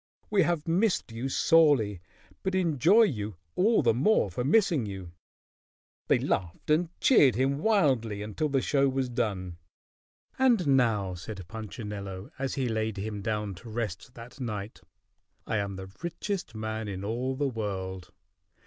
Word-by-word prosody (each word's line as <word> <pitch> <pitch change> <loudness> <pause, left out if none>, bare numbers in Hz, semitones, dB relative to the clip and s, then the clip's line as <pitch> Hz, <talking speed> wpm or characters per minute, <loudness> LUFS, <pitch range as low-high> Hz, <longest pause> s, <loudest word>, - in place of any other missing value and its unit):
"We 205 -2 +4
have 170 -2 0
missed 180 - +1
you 120 +4 -4
sorely, 135 - +4 0.4
but 190 0 -1
enjoy 180 - +4
you 105 - -1 0.2
all 215 -1 +3
the 115 -2 +4
more 130 - +2
for 125 - -2
missing 160 - +3
you." 95 -3 -7 1.0
They - - +4
laughed 90 - -2
and 160 +2 +3
cheered 145 - +5
him 135 +3 +1
wildly 135 - +2
until 110 +9 -2
the 135 -2 +1
show 140 -1 +2
was 130 -1 -1
done. 100 -8 -2 0.8
"And 220 - +4
now," 105 -7 +2
said 95 0 -8
Punchinello, 105 -2 -7
as 135 -1 -2
he 130 -2 0
laid 110 -2 -1
him 105 +1 -4
down 105 -1 -2
to 105 +6 -11
rest 110 +2 -5
that 120 +4 -11
night, 105 -4 -5 0.6
"I 110 - -1
am 100 -1 -2
the 95 0 -8
richest 180 - -4
man 110 0 -4
in 95 -1 -5
all 125 +5 -2
the 145 +1 0
world. 95 -6 -4
115 Hz, 150 wpm, -28 LUFS, 105-145 Hz, 1.0 s, cheered